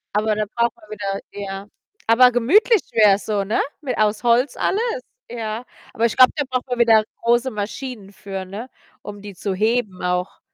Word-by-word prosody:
Aber 215 Hz, 0 st, +1 dB
da 215 Hz, -, -1 dB
braucht 235 Hz, 0 st, +1 dB
man 215 Hz, -, -20 dB
wieder 200 Hz, -2 st, -3 dB
ja. 195 Hz, 0 st, -6 dB, 0.4 s
Aber 250 Hz, +2 st, +6 dB
gemütlich 370 Hz, -, +4 dB
wär's 205 Hz, -2 st, +4 dB
so, 205 Hz, -2 st, 0 dB
ne, 210 Hz, +3 st, -1 dB, 0.2 s
mit 255 Hz, -4 st, -3 dB
aus 215 Hz, +1 st, +1 dB
Holz 240 Hz, +3 st, +3 dB
alles, 460 Hz, +4 st, 0 dB, 0.3 s
ja. 225 Hz, 0 st, -5 dB, 0.3 s
Aber 230 Hz, -, +1 dB
ich 235 Hz, -, 0 dB
glaube, 255 Hz, -, +7 dB
da 290 Hz, -, 0 dB
braucht 255 Hz, 0 st, -2 dB
man 245 Hz, -, -2 dB
wieder 225 Hz, -2 st, +5 dB, 0.2 s
große 240 Hz, +2 st, +2 dB
Maschinen 215 Hz, 0 st, -6 dB
für, 195 Hz, -1 st, -7 dB
ne, 205 Hz, +7 st, -8 dB, 0.3 s
um 205 Hz, -1 st, -9 dB
die 205 Hz, 0 st, -9 dB
zu 190 Hz, +2 st, -3 dB
heben 215 Hz, -2 st, 0 dB
auch. 180 Hz, +1 st, -2 dB
220 Hz, 180 wpm, -21 LUFS, 205-245 Hz, 0.4 s, glaube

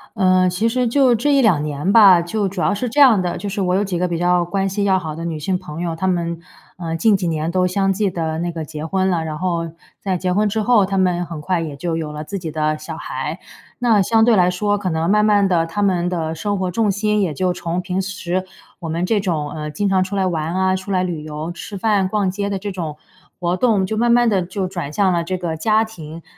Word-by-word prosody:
呃， 185 Hz, -3 st, +3 dB
其 200 Hz, +6 st, 0 dB
实 250 Hz, +1 st, +1 dB
就 255 Hz, 0 st, +4 dB
这 285 Hz, +6 st, +1 dB
1、2 215 Hz, -, +4 dB
年 150 Hz, +5 st, -1 dB
吧。 195 Hz, -6 st, +8 dB
就 200 Hz, +4 st, -1 dB
主 190 Hz, 0 st, -6 dB
要 -, -, +2 dB
是 230 Hz, +4 st, -2 dB
这 290 Hz, -, -1 dB
样 240 Hz, -9 st, +7 dB
的， 175 Hz, -1 st, -2 dB
就 205 Hz, -, -5 dB
是 200 Hz, +1 st, -3 dB
我 180 Hz, -1 st, +1 dB
有 200 Hz, -, +2 dB
几 190 Hz, -3 st, -2 dB
个 180 Hz, -, +1 dB
比 170 Hz, -1 st, -2 dB
较 175 Hz, 0 st, +2 dB
关 195 Hz, +3 st, -1 dB
系 200 Hz, +2 st, -2 dB
要 190 Hz, -1 st, +3 dB
好 160 Hz, -4 st, -5 dB
的 165 Hz, +1 st, -6 dB
女 160 Hz, -2 st, -3 dB
性 185 Hz, +5 st, -1 dB
朋 170 Hz, -3 st, -8 dB
友， 170 Hz, -2 st, -2 dB
她 190 Hz, +3 st, -2 dB
们， 170 Hz, -2 st, -1 dB, 0.4 s
呃， 165 Hz, -2 st, -4 dB
近 215 Hz, +4 st, +4 dB
几 185 Hz, -2 st, -1 dB
年 160 Hz, 0 st, -1 dB
都 180 Hz, 0 st, +2 dB
相 195 Hz, +1 st, +1 dB
继 200 Hz, +1 st, 0 dB
地 160 Hz, -3 st, -3 dB
那 175 Hz, +1 st, -2 dB
个 165 Hz, -2 st, -5 dB
结 155 Hz, +1 st, -6 dB
婚 190 Hz, +3 st, 0 dB
了。 170 Hz, -3 st, 0 dB
然 155 Hz, -1 st, -4 dB
后 170 Hz, -1 st, -2 dB, 0.3 s
在 190 Hz, -2 st, -1 dB
结 180 Hz, +1 st, -1 dB
婚 210 Hz, +2 st, +2 dB
之 220 Hz, +2 st, -1 dB
后， 215 Hz, -2 st, +4 dB
她 195 Hz, 0 st, -2 dB
们 180 Hz, -2 st, +1 dB
很 165 Hz, -2 st, -7 dB
快 175 Hz, +3 st, -1 dB
也 155 Hz, -3 st, -5 dB
就 165 Hz, +3 st, -3 dB
有 155 Hz, -2 st, -4 dB
了 150 Hz, 0 st, -6 dB
自 195 Hz, +5 st, -5 dB
己 165 Hz, -3 st, -5 dB
的 155 Hz, 0 st, 0 dB
小 -, -, -7 dB
孩。 -, -, -5 dB, 0.4 s
那 230 Hz, -4 st, +3 dB
相 220 Hz, +3 st, +3 dB
对 235 Hz, -2 st, +5 dB
来 180 Hz, -1 st, +4 dB
说 205 Hz, +3 st, 0 dB
可 195 Hz, -2 st, -2 dB
能 160 Hz, 0 st, -1 dB
慢 210 Hz, +1 st, +4 dB
慢 205 Hz, -2 st, +4 dB
地， 170 Hz, -3 st, +2 dB
她 205 Hz, +5 st, -2 dB
们 180 Hz, -3 st, +1 dB
的 165 Hz, -3 st, -2 dB
生 205 Hz, +5 st, -2 dB
活 185 Hz, -1 st, -2 dB
重 215 Hz, +2 st, +1 dB
心， 210 Hz, +1 st, 0 dB
也 175 Hz, -6 st, 0 dB
就 180 Hz, +4 st, 0 dB
从 170 Hz, 0 st, -3 dB
平 185 Hz, +1 st, -2 dB
时 185 Hz, -1 st, -3 dB, 0.3 s
我 165 Hz, -3 st, -6 dB
们 170 Hz, +3 st, -1 dB
这 210 Hz, +3 st, +1 dB
种， 160 Hz, -7 st, -2 dB
呃， 150 Hz, -1 st, -5 dB
经 175 Hz, +7 st, -1 dB
常 190 Hz, -1 st, +2 dB
出 190 Hz, +2 st, -5 dB
来 195 Hz, -1 st, +1 dB
玩 165 Hz, -1 st, -2 dB
啊， 185 Hz, 0 st, +2 dB
出 190 Hz, +1 st, -7 dB
来 185 Hz, -1 st, +1 dB
旅 170 Hz, -4 st, -4 dB
游， 155 Hz, +2 st, -5 dB
吃 185 Hz, +3 st, -8 dB
饭， 200 Hz, -1 st, +1 dB
逛 195 Hz, -1 st, 0 dB
街 200 Hz, +1 st, -3 dB
的 200 Hz, -, -2 dB
这 200 Hz, +1 st, -5 dB
种 165 Hz, -5 st, -5 dB, 0.4 s
活 175 Hz, 0 st, 0 dB
动， 215 Hz, -5 st, +2 dB
就 215 Hz, +4 st, -3 dB
慢 235 Hz, +2 st, +2 dB
慢 240 Hz, 0 st, +4 dB
地 200 Hz, -4 st, +2 dB
就 185 Hz, +2 st, -3 dB
转 175 Hz, -6 st, -5 dB
向 190 Hz, +3 st, +2 dB
了 170 Hz, -, 0 dB
这 185 Hz, +2 st, -3 dB
个 170 Hz, -3 st, -3 dB
家 215 Hz, +7 st, +2 dB
庭。 165 Hz, -6 st, -10 dB
185 Hz, 280 characters per minute, -19 LUFS, 170-200 Hz, 0.4 s, 吧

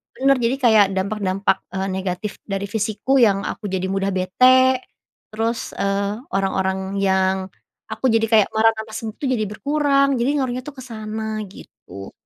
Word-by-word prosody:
bener 275 Hz, 0 st, +3 dB
jadi 235 Hz, +3 st, +1 dB
kayak 220 Hz, -5 st, +5 dB
dampak-dampak, 195 Hz, -1 st, 0 dB, 0.2 s
eee, 190 Hz, 0 st, -1 dB
negatif 190 Hz, +2 st, -4 dB
dari 195 Hz, -1 st, -3 dB
fisikku 220 Hz, +5 st, 0 dB
yang 200 Hz, -3 st, +3 dB
aku 210 Hz, -, -5 dB
jadi 190 Hz, 0 st, -1 dB
mudah 195 Hz, 0 st, 0 dB
bete, 255 Hz, +8 st, +4 dB, 0.5 s
terus, 225 Hz, +2 st, -3 dB
eee, 200 Hz, +3 st, -1 dB
orang-orang 190 Hz, 0 st, -1 dB
yang, 190 Hz, -1 st, +2 dB, 0.5 s
aku -, -, -4 dB
jadi 225 Hz, 0 st, +2 dB
kayak 215 Hz, -3 st, +5 dB
marah 225 Hz, +1 st, +5 dB
tanpa 220 Hz, 0 st, -8 dB
sebab 220 Hz, -1 st, -6 dB
itu -, -, -2 dB
jadi 215 Hz, -3 st, 0 dB
berkurang 280 Hz, +2 st, +1 dB
jadi 240 Hz, -, +1 dB
ngaruhnya 255 Hz, -1 st, -2 dB
tuh 295 Hz, -, -6 dB
ke 260 Hz, -, -8 dB
sana 220 Hz, -2 st, -5 dB, 0.2 s
gitu. 100 Hz, -, -12 dB
215 Hz, 155 wpm, -21 LUFS, 195-240 Hz, 0.5 s, kayak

